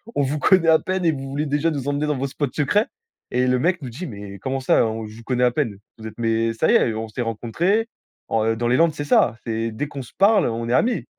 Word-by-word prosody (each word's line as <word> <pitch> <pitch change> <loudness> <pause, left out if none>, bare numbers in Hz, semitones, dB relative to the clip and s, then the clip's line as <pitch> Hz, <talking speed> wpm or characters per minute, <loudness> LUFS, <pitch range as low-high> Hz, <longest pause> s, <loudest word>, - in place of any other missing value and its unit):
on 145 - +2
vous 145 +3 -1
connait 185 0 +4
à 160 -1 +6
peine 185 -1 -2
et 165 - +3
vous 135 -1 -6
voulez 145 +3 -2
déjà 150 +3 0
nous 140 -2 -4
emmener 145 +1 0
dans 150 -2 0
vos 135 +2 -2
spots 145 +2 -2
secrets?» 205 +10 +1 0.4
Et 125 +1 +1
le 125 0 +2
mec 175 +2 +1
nous 130 - -6
dit: 155 +10 -7
«Mais 100 -4 -9
comment 135 +6 -2
ça 130 - +3
"On 110 0 -3
je 105 - -12
vous 115 - -12
connais 125 +1 +1
à 125 - +3
peine"? 120 -6 -2 0.2
Vous 110 - -11
êtes 110 - -11
mais 115 -1 +1
ça 115 - +1
y - - +5
est, 115 - +3
on 110 +1 -4
s'est 110 +3 -5
rencontré, 165 - 0 0.4
on 115 0 +1
dans 120 +1 -1
les 120 - +3
Landes, 165 -2 +4
c'est 145 - -4
ça, 120 -5 +3
c'est 115 0 -2
dès 145 +7 -4
qu'on 140 -2 -7
se - - -16
parle, 205 +2 +4
on 115 +1 -3
est 120 - 0
amis». 235 - +1
130 Hz, 280 wpm, -22 LUFS, 115-150 Hz, 0.4 s, à